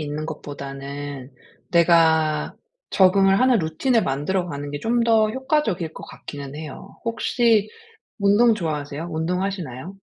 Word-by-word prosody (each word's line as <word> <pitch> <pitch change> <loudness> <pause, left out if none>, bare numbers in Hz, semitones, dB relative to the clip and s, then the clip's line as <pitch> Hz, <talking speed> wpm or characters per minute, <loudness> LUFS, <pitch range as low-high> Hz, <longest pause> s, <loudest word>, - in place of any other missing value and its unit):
있는 150 +1 -4
것보다는 140 -2 -7 0.4
내가 160 -3 +3 0.3
적응을 195 0 +4
하는 255 -3 +4
루틴을 215 +10 +1
만들어 160 +7 -1
가는 145 -1 -5
게 145 - -4
좀 235 +1 +1
더 220 -2 +3
효과적일 240 - -1
것 - - -9
같기는 140 -1 -9
해요. 150 -3 -9
혹시 230 -1 +2 0.5
운동 205 +4 +4
좋아하세요? 155 -4 -4
운동하시나요? 180 -1 -3
170 Hz, 290 characters per minute, -22 LUFS, 145-210 Hz, 0.5 s, 적응을